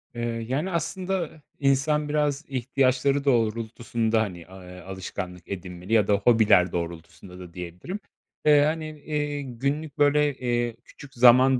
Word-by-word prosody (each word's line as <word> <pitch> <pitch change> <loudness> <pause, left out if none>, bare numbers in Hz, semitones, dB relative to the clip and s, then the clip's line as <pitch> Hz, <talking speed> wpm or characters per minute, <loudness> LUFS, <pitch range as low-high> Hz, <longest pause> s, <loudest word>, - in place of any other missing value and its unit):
Eee, 115 -1 -3
yani, 150 +9 -1
aslında, 170 0 -2 0.2
insan 145 +2 +2
biraz 150 0 0
ihtiyaçları 135 +1 +1
doğrultusunda, 115 -2 +1
hani, 90 -6 -5
a 95 0 -12
eee, 90 0 -10
alışkanlık 90 -1 -7
edinmeli 90 +1 -6
ya 105 -3 +4
da 105 - +3
hobiler 100 -4 +4
doğrultusunda 85 +2 -6
da 90 -2 -10
diyebilirim. 90 - -6 0.5
Eee, 150 -1 +7
hani, 155 +2 0
eee, 145 0 -2
günlük 140 +4 -3
böyle, 145 0 +3
eee, 120 -2 -1
küçük 140 -2 -14
zaman 125 +2 +6
125 Hz, 135 wpm, -25 LUFS, 100-145 Hz, 0.5 s, Eee